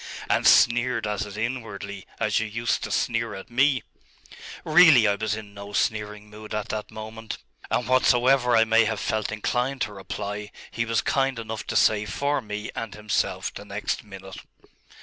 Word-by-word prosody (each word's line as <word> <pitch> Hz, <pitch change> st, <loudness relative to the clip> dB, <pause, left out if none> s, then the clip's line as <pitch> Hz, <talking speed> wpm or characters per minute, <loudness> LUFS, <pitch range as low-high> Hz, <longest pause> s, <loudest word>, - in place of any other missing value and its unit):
'And -, -, +2 dB
sneered 120 Hz, -1 st, +4 dB
at 105 Hz, -1 st, -2 dB
it 105 Hz, 0 st, -9 dB
inwardly, 105 Hz, -5 st, -5 dB
as 105 Hz, -1 st, +1 dB
you 110 Hz, -, -2 dB
used 115 Hz, +2 st, -1 dB
to 110 Hz, -, -4 dB
sneer 115 Hz, -1 st, 0 dB
at 95 Hz, +4 st, -10 dB
me.' 130 Hz, +1 st, +3 dB, 0.8 s
'Really 155 Hz, -7 st, +7 dB
I 100 Hz, -, +3 dB
was 105 Hz, +1 st, -1 dB
in 105 Hz, -2 st, -9 dB
no 100 Hz, 0 st, -9 dB
sneering 105 Hz, 0 st, -1 dB
mood 105 Hz, 0 st, -8 dB
at 105 Hz, -1 st, -3 dB
that 105 Hz, -1 st, -4 dB
moment; 110 Hz, +1 st, -7 dB, 0.3 s
and 125 Hz, -, 0 dB
whatsoever 125 Hz, -1 st, +4 dB
I 115 Hz, -, +6 dB
may 115 Hz, 0 st, +4 dB
have 110 Hz, -1 st, -1 dB
felt 110 Hz, -1 st, -1 dB
inclined 125 Hz, +5 st, -1 dB
to 105 Hz, -, -1 dB
reply, 105 Hz, +1 st, -5 dB, 0.2 s
he 115 Hz, -, -1 dB
was 115 Hz, -2 st, +1 dB
kind 135 Hz, -2 st, +1 dB
enough 110 Hz, -1 st, -6 dB
to -, -, -3 dB
say 105 Hz, -1 st, +4 dB
for 140 Hz, +8 st, -1 dB
me 105 Hz, -1 st, -5 dB
and 110 Hz, -3 st, -5 dB
himself 105 Hz, -1 st, -1 dB
the -, -, -8 dB
next -, -, -3 dB
minute. 95 Hz, -1 st, -10 dB
110 Hz, 175 wpm, -25 LUFS, 105-120 Hz, 0.8 s, Really